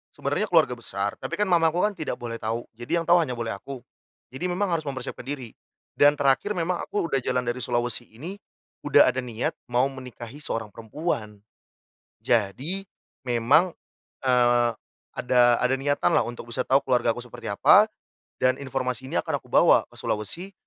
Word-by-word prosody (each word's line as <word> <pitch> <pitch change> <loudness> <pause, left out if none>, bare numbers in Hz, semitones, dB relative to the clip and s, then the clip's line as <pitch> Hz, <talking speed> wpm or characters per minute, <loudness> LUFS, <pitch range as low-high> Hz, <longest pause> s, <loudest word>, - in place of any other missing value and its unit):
sebenarnya - - -1
keluarga - - +4
besar, 100 +1 -3
tapi - - -3
kan 210 - +2
mamaku 170 -1 +3
kan 210 - 0
tidak 160 -5 -4
boleh 115 -1 -6
tahu. 115 +2 -2
Jadi 120 +9 -2
yang 165 - -2
tahu 175 +1 +6
hanya 130 -6 -2
boleh 115 -2 -3
aku. 125 +5 -8 0.5
Jadi 180 +8 -3
memang 185 +2 -1
harus 165 - +1
mempersiapkan 135 -1 -5
diri. 135 -5 -5 0.4
Dan 145 0 +5
terakhir 140 +8 +2
memang 175 +1 -1
aku 205 - -2
udah 135 -4 0
jalan 125 0 -1
dari 120 +1 -2
Sulawesi 120 0 -2
ini, 150 - -8 0.5
udah - - +6
ada 130 - 0
niat 120 -2 -3 0.2
mau 125 +1 +3
menikahi 130 0 -9
seorang 115 -5 -3
perempuan. 110 -3 -4 0.8
Jadi, 120 - 0 0.4
memang, 125 +9 +3 0.5
eee, 120 -1 +4 0.4
ada 120 -1 +4
ada 125 +1 +3
niatanlah, 145 +1 +2
untuk 120 0 -7
bisa 130 +1 -2
tahu 135 +1 +4
keluargaku 120 -2 +1
seperti 125 - -12
apa, - - +6 0.5
dan 130 0 +3
informasi 130 -1 -3
ini - - -2
akan - - -2
aku - - -20
bawa - - +6
ke - - -18
Sulawesi. 135 - -3
125 Hz, 165 wpm, -25 LUFS, 120-150 Hz, 0.8 s, tahu